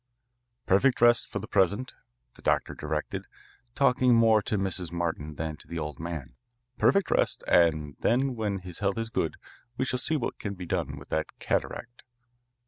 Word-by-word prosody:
"Perfect 120 +8 +3
rest 120 -1 +5
for - - -5
the 105 +2 -5
present," 100 +8 +1 0.4
the - - -17
doctor - - +1
directed, - - -4 0.5
talking 125 -2 +4
more 115 -2 +5
to 105 - -1
Mrs. 95 -3 -1
Martin 80 -3 -3
than 80 0 -4
to - - -14
the 85 - -5
old 75 -2 -4
man. 80 -7 -5 0.5
"Perfect 200 -2 +3
rest, - - +1
and 80 -4 +3
then 130 +2 +2
when 105 -3 -1
his 90 -2 -8
health 100 0 0
is 115 0 -3
good, 80 - -1 0.4
we 130 - +1
shall 125 -1 -1
see 155 +4 +1
what 125 - -3
can 100 -1 -4
be 90 -1 -7
done - - -2
with - - -12
that 80 0 -2
cataract." 120 0 -3
100 Hz, 175 wpm, -28 LUFS, 85-120 Hz, 0.5 s, rest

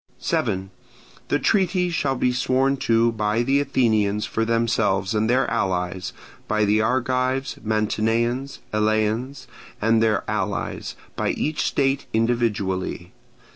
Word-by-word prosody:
7. 95 +1 -1 0.6
The 145 - +2
treaty 180 0 +1
shall 140 -5 0
be 125 0 +1
sworn 130 +2 +2
to 115 -2 +2
by 110 +1 0
the 135 +3 +2
Athenians 110 -7 +1
for 115 - -1
themselves 115 -4 +1
and 110 +1 +1
their 130 +2 +3
allies, 90 -1 -1 0.4
by 110 0 +2
the 105 +1 +3
Argives, 130 +2 0
Mantineans, 115 +4 0 0.2
Eleans, 110 +5 0 0.3
and 115 +1 +3
their 110 -2 +2
allies, - - -3 0.2
by - - -1
each 155 0 -1
state 135 0 0
individually. 110 -5 -1
115 Hz, 120 wpm, -23 LUFS, 105-130 Hz, 0.6 s, their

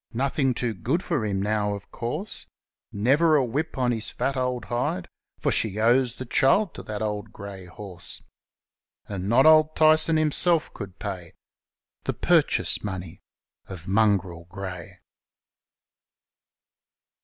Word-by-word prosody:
Nothing 135 +1 0
too 120 -1 -1
good 130 - -1
for 160 -10 -1
him 100 -2 -1
now, 105 0 0
of 100 - -11
course; 150 - -5 0.4
Never 140 +10 +3
a 140 -3 +3
whip 145 +7 -3
on 125 -2 +2
his 115 -2 -3
fat 140 - -2
old 125 -3 -1
hide, 120 -6 -2 0.3
For - - +1
she 105 -2 0
owes 120 +2 +3
the 130 - -7
child 150 - +3
to - - -8
that 105 -1 -6
brave 105 -2 -3
grey 100 -2 -9
horse. 90 -1 -6 0.8
And 100 -1 -4
not 120 +5 +5
Old 155 0 +6
Tyson 155 +1 +4
himself 155 +2 +2
could 100 -1 -8
pay 95 -5 -6 0.7
The - - 0
purchase - - +2
money 95 -3 -6 0.5
of 90 -3 -9
Mongrel 95 -4 +1
Grey. 90 -2 -8
110 Hz, 135 wpm, -25 LUFS, 100-135 Hz, 0.8 s, Old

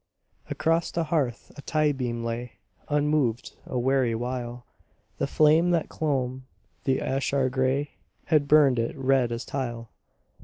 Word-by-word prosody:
Across 165 +1 +1
the 165 - 0
hearth 150 -7 -2
a - - -8
tie 155 0 +1
beam 120 -4 -3
lay 115 +1 -4 0.4
Unmoved 145 -5 0
a 125 - -3
weary 125 -2 +2
while. 120 0 -4 0.5
The - - 0
flame 155 +4 +4
that 170 -3 +1
clomb 130 -4 -2 0.4
the 130 -1 +2
ashlar 135 0 0
grey 135 +2 0 0.3
Had 150 -3 +2
burned 140 -4 +5
it 115 +3 -2
red 130 -2 +2
as 115 +1 -4
tile. 120 -4 -4
130 Hz, 140 wpm, -26 LUFS, 120-150 Hz, 0.5 s, burned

